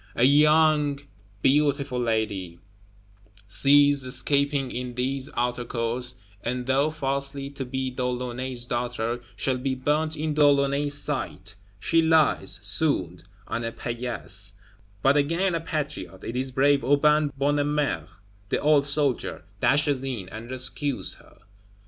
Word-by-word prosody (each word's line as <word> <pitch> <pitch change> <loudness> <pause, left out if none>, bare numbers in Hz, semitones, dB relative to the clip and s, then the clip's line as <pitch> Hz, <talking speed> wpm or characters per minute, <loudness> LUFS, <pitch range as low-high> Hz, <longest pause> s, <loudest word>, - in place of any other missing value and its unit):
A 120 - +1
young 150 +1 +4 0.4
beautiful 140 -2 +2
lady, 110 -7 -2 0.9
seized, 145 +5 +5
escaping, 140 +1 +1
in 125 0 -5
these 130 +2 -2
Outer 120 0 0
Courts, 120 +1 -2 0.3
and 125 +1 -2
thought 140 +4 +1
falsely 140 -1 -2
to 135 -1 -5
be 130 0 -3
De 125 0 -4
Launay's 125 0 -3
daughter, 120 -1 -2
shall 130 -1 -1
be 130 +1 -1
burnt 155 +4 0
in 155 0 -1
De 150 0 +3
Launay's 140 0 +2
sight; 130 -9 -3 0.2
she 165 +11 +2
lies, 160 -11 +2
swooned, 100 - 0 0.2
on 115 - -3
a 115 - -2
paillasse; 115 -5 -4 0.5
but 135 +1 +5
again 165 +6 +1
a 165 - -1
Patriot 150 - -4
it 115 - -5
is 130 +1 -1
brave 140 +1 +2
Aubin 150 +2 +3
Bonnemère, 145 - 0 0.4
the - - +1
old 145 -1 +3
soldier 140 - 0 0.2
dashes 145 0 +2
in, 120 -9 -4
and 110 +4 -9
rescues 130 +2 0
her. - - -21
135 Hz, 130 wpm, -25 LUFS, 120-145 Hz, 0.9 s, seized